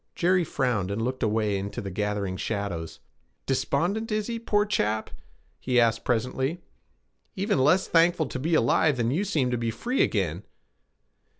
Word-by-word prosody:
Jerry 180 +1 +3
frowned, 125 - -1
and 100 +2 -2
looked 125 +3 -2
away 105 -2 +1
into 100 +1 -5
the 100 - -5
gathering 105 -1 -2
shadows. 95 -6 -4 0.4
'Despondent 175 - 0
is 215 0 0
he, 230 0 -4
poor 210 -2 +1
chap?' 110 - -1 0.5
he 125 -1 +2
asked 115 -1 +2
presently. 130 +6 -1 0.8
'Even 200 -4 0
less 180 +8 +3
thankful 170 -1 +3
to 130 - -5
be 160 +5 +1
alive 145 +2 +3
than 120 0 0
you 170 +9 0
seem 150 -11 0
to 120 - -1
be 115 -1 -1
free 240 - -1
again.' 90 -3 0
125 Hz, 160 wpm, -26 LUFS, 105-175 Hz, 0.8 s, Jerry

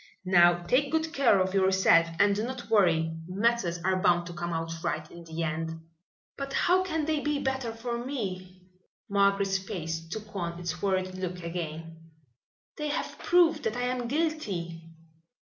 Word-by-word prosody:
"Now 175 -1 +5
take 270 +9 +2
good 320 0 0
care 240 -8 +4
of 185 0 0
yourself 190 -3 +4
and 200 0 +5
do 210 - -1
not 240 -3 -6
worry. 165 -6 +3
Matters 200 -2 +1
are 185 0 +1
bound 175 -1 +3
to 175 - -7
come 175 0 -4
out 165 0 -3
right 155 0 -2
in 170 0 -11
the 165 +1 -4
end." 165 +1 -3 0.6
"But 275 0 -4
how 365 +2 +3
can 320 -5 -1
they 310 -1 0
be 295 0 -1
better 265 -4 -2
for 235 +1 -4
me?" 185 -8 -5 0.5
Margaret's 200 -1 +2
face 165 -4 -5
took 215 +2 -7
on 170 -2 -3
its 165 -2 -4
worried 185 -2 0
look 180 -1 -5
again. 165 -1 -6 0.7
"They 300 - -2
have 295 - -3
proved 335 -3 +4
that 220 +2 -1
I 245 - -1
am 250 -1 -1
guilty." 200 - -2
190 Hz, 165 wpm, -28 LUFS, 170-245 Hz, 0.7 s, Now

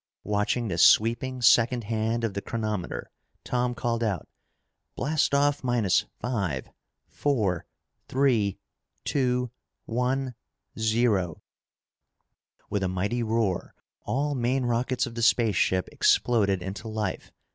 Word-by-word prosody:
Watching 105 +3 0
the 95 - -2
sweeping 120 +3 +4
second 120 +1 +5
hand 110 +2 -1
of 110 -3 -1
the 100 - -3
chronometer, 110 -6 -4 0.3
Tom 125 0 -1
called 115 -2 -1
out, 100 -8 -2 0.7
"Blast 150 -1 +1
off 145 0 +2
minus 120 -7 +2
five 95 - -2 0.4
four 105 - -1 0.4
three 120 -7 +2 0.5
two 125 -3 0 0.3
one 125 +2 -1 0.5
zero!" 110 -6 +1 1.2
With 100 - -2
a 95 - +1
mighty 100 +7 -1
roar, 110 -5 -1 0.3
all 145 +3 -1
main 130 0 0
rockets 120 +1 0
of 120 - -7
the 115 - -4
spaceship 110 -5 +3
exploded 100 -6 +2
into 100 +4 -6
life. 110 -1 -3
115 Hz, 115 wpm, -27 LUFS, 105-125 Hz, 1.2 s, second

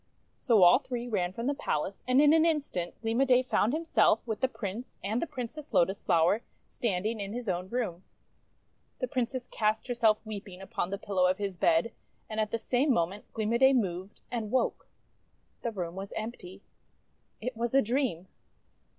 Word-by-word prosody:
So 225 -7 +4
all 175 +8 +8
three 245 -3 -5
ran 180 -6 0
from 230 +5 -5
the 285 - +1
palace; 195 - -3
and 255 +1 +4
in 295 +1 +6
an 320 0 +5
in 325 -2 +3
stant 180 -11 -5
Gleam 225 +3 +1
o' - - +7
Day 255 -1 +4
found 240 -3 +1
himself, 315 -7 +2
with 220 -3 -3
the 260 - +4
Prince 225 0 -6
and 215 +5 -1
the 335 - -1
Princess 280 +4 -6
Lotus 190 +3 +2
Flower, 175 +5 +3 0.3
standing 215 0 -2
in 200 0 -4
his 245 -1 -5
own 180 0 -2
room. 205 -7 -3 0.9
The 255 - -2
Princess 250 0 -2
cast 215 +1 0
herself 230 -3 +3
weeping 200 -3 -7
upon 190 -2 -3
the 200 - -3
pillow 190 -2 +1
of 185 +1 +1
his 200 -2 -3
bed; 170 +5 +2 0.4
and 220 0 -4
at 215 -1 +1
the 230 - -1
same 250 +5 +1
moment 190 -1 -1
Gleam 220 0 0
o' - - +4
Day 265 +1 +6
moved, 190 -5 -2
and 230 -3 -3
woke. 255 +3 0 0.7
The 235 - -1
room 175 -5 -4
was 195 +1 -7
empty. 200 -4 -7 0.8
It 250 +2 -4
was 235 +2 -2
a 275 - +7
dream! 230 - -1
220 Hz, 190 wpm, -29 LUFS, 190-250 Hz, 0.9 s, all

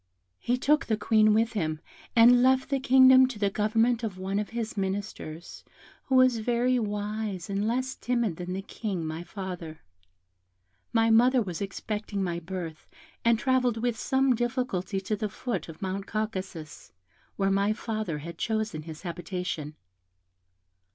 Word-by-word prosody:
He 245 - 0
took 300 +5 +2
the 220 - +1
Queen 215 -1 +4
with 225 +2 +2
him, 155 -7 -1 0.4
and 245 +1 +7
left 260 +2 +3
the 275 - +2
kingdom 260 0 +7
to 255 -4 -7
the 200 -1 0
government 225 +3 +2
of 215 -5 -4
one 190 +2 -2
of 210 - -3
his 230 -1 -4
ministers, 190 -4 -5 0.4
who 265 - 0
was 255 -2 +5
very 245 +2 +1
wise, 210 -3 -3
and 200 +2 0
less 255 +3 -1
timid 235 -8 -1
than 180 0 -5
the 195 +1 -4
King, 195 -5 -4
my 160 +1 -4
father. 175 -3 -7 1.1
My 225 0 +3
mother 250 +3 +5
was 185 -6 -3
expecting 205 0 -3
my 170 -2 -2
birth, 175 -2 -7 0.4
and 230 0 +4
travelled 255 -1 +1
with 240 0 0
some 265 +3 +2
difficulty 240 -6 -1
to 205 +3 -2
the 215 0 -3
foot 230 -1 -4
of 160 +3 -9
Mount 195 +1 -3
Caucasus, 190 - -5 0.4
where 195 -1 +1
my 200 +2 +2
father 215 -7 -3
had 170 +3 -8
chosen 220 -7 -1
his 155 +1 -10
habitation. 175 -3 -4
215 Hz, 155 wpm, -28 LUFS, 185-235 Hz, 1.1 s, and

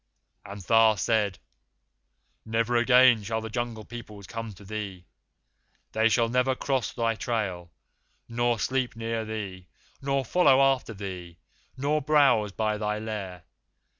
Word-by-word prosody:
"And 100 +1 -9
Tha 115 +1 +5
said: 105 -2 +1 1.1
'Never 115 +2 0
again 125 -1 +6
shall 110 +2 -2
the 110 -1 -7
Jungle 120 -2 -4
Peoples 105 -4 -10
come 115 0 -6
to 100 +2 -15
thee. 100 -3 -6 0.9
They 110 +1 +3
shall 115 +1 +2
never 125 +2 +1
cross 130 -4 -1
thy 115 -2 0
trail, 100 -7 -3 0.6
nor 120 0 0
sleep 130 +2 -1
near 115 0 -3
thee, 100 -5 -6 0.3
nor 135 -1 0
follow 135 -2 +4
after 135 -4 +2
thee, 90 -4 -7 0.4
nor 145 +3 0
browse 140 -8 +3
by 105 +1 -1
thy 105 0 -1
lair. 100 -5 -6
115 Hz, 135 wpm, -27 LUFS, 105-120 Hz, 1.1 s, again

